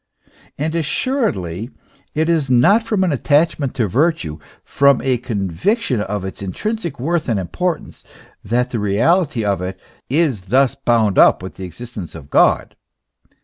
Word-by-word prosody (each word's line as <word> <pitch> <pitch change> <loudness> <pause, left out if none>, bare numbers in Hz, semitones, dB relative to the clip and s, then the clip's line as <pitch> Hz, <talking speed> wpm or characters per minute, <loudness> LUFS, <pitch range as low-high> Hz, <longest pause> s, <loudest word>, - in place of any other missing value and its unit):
And 155 +3 -2
assuredly 145 - -1 0.5
it 160 +1 +1
is 160 -5 +1
not 130 - +5
from 215 -4 0
an 180 - +1
attach 150 +4 +2
ment 135 -3 -3
to 115 -6 +1
virtue, 100 - 0 0.2
from 140 -1 +3
a 130 -3 +1
conviction 115 - -1
of 105 -2 -3
its 95 - -7
intrinsic 170 - -4
worth 160 +3 -1
and 110 -4 +1
im 90 - -5
portance, 180 -3 -3 0.4
that 125 +4 0
the 115 - -2
reality 115 - +1
of 100 -3 0
it 95 +1 -5 0.3
is 140 - +1
thus 130 +5 +3
bound 115 -7 +1
up - - +5
with 95 - -7
the 95 - -7
ex 90 - -14
istence 110 -10 -8
of 70 -3 -11
God. - - +3
125 Hz, 160 wpm, -19 LUFS, 100-160 Hz, 0.5 s, not